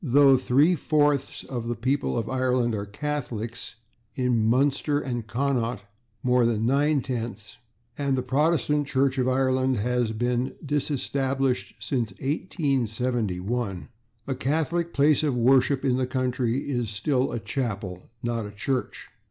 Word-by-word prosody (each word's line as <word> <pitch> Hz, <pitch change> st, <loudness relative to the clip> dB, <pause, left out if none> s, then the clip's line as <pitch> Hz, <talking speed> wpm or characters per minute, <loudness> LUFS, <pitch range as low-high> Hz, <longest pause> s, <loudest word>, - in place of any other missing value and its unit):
Though 140 Hz, 0 st, +6 dB
three 135 Hz, +6 st, +3 dB
fourths 145 Hz, -3 st, +1 dB
of 120 Hz, -3 st, -5 dB
the 120 Hz, -, -1 dB
people 130 Hz, +3 st, 0 dB
of 115 Hz, -2 st, -2 dB
Ireland 125 Hz, -2 st, +1 dB
are 100 Hz, -1 st, -3 dB
Catholics 120 Hz, -2 st, -4 dB, 0.4 s
(in 125 Hz, -2 st, +1 dB
Munster 140 Hz, +4 st, +2 dB
and 120 Hz, -5 st, -4 dB
Connaught, 120 Hz, -2 st, -1 dB, 0.4 s
more 125 Hz, -1 st, +3 dB
than 115 Hz, -2 st, +1 dB
nine 140 Hz, +3 st, +2 dB
tenths), 115 Hz, -3 st, -5 dB, 0.4 s
and 140 Hz, -2 st, +1 dB
the 130 Hz, -, -1 dB
Protestant 150 Hz, +1 st, +1 dB
Church 135 Hz, -1 st, +1 dB
of 125 Hz, -, +1 dB
Ireland 130 Hz, 0 st, +2 dB
has 120 Hz, +1 st, 0 dB
been 120 Hz, +3 st, -1 dB
disestablished 135 Hz, -5 st, -1 dB
since 120 Hz, -3 st, -2 dB
1871, 120 Hz, -, -2 dB, 0.4 s
a 135 Hz, -, -1 dB
Catholic 160 Hz, +6 st, -1 dB
place 145 Hz, -1 st, +3 dB
of 145 Hz, -4 st, 0 dB
worship 130 Hz, +3 st, +3 dB
in 130 Hz, -2 st, +2 dB
the 130 Hz, -1 st, 0 dB
country 130 Hz, -1 st, -1 dB
is 120 Hz, -5 st, -1 dB
still 125 Hz, +6 st, 0 dB
a -, -, -2 dB
/chapel/ 110 Hz, -7 st, -3 dB
and -, -, -19 dB, 0.2 s
not 115 Hz, -2 st, -2 dB
a -, -, -8 dB
/church 125 Hz, +6 st, -2 dB
130 Hz, 140 wpm, -26 LUFS, 120-140 Hz, 0.4 s, Though